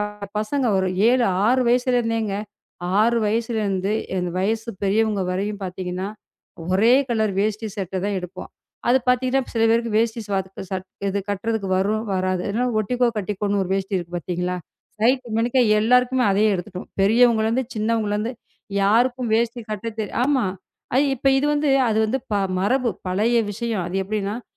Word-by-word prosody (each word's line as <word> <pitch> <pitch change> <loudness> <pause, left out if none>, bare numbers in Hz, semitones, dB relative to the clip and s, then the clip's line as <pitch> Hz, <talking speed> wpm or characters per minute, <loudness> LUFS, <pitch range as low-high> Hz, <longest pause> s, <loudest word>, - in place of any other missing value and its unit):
ப-பசங்க 210 +5 -2
ஒரு 190 0 +1 0.2
7, 250 -1 +3 0.2
6 255 +1 +3
வயசுல 250 0 +2
இருந்தேங்க 225 -3 -1 0.6
6 235 +2 +4
வயதிலிருந்து 210 -3 0 0.3
இந்த 180 -1 -1
வயசு 220 +4 -1
பெரியவங்க 205 0 +1
வரையும் 200 +3 -2
பார்த்தீங்கன்னா, 185 0 -4 0.6
ஒரே 215 +6 +4 0.2
color 220 -2 +2
வேஷ்டி 215 +2 0
சட்டை 190 -1 -3
தான் 205 0 -1
எடுப்போம். 185 +1 -8 0.4
அது 255 +2 +5
பார்த்தீங்கன்னா, 255 +1 +2
சில 225 -1 +2
பேருக்கு 230 -1 +1
வேஷ்டி 230 +1 +1 0.4
க - - -5
சட் 190 -1 -4 0.2
இது 200 +1 -1
கட்டுகிறதற்கு 205 0 -2
வரும், 215 +3 0
வராது. 185 -1 0
அதனால் 240 +3 0
ஒட்டிக்கோ 245 +3 +1
கட்டிக்கோன்னு 205 0 -1
ஒரு 185 - -7
வேஷ்டி 195 0 -1
இருக்கு 175 0 -8
பார்த்தீங்களா? 180 +1 -2 0.5
சைஸ் 255 +2 +3
மேனிக்கா 240 +3 +2 0.2
எல்லாருக்குமே 250 +2 +3
அதையே 210 +3 +3
எடுத்துட்டோம். 180 0 -6
பெரியவர்களிலிருந்து, 230 +3 +3
சின்னவர்களிருந்து 215 0 0 0.5
யாருக்கும் 240 +3 +2
வேஷ்டி 235 +1 0
கட்ட 215 +2 -4
தெ 215 - -1 0.2
ஆமா, 270 -3 +2 0.5
அது 270 +3 +4
இப்ப 270 - +1
இது 280 - +1
வந்து, 295 0 +1 0.2
அது 220 - +1
வந்து 260 +5 0
ப - - +2 0.3
மரபு, 250 +5 +1 0.2
பழைய 215 +6 +2
விஷயம். 225 -3 -2
அது 180 - -3
எப்படியென்றால், 210 +3 -3
220 Hz, 150 wpm, -22 LUFS, 195-240 Hz, 0.6 s, அது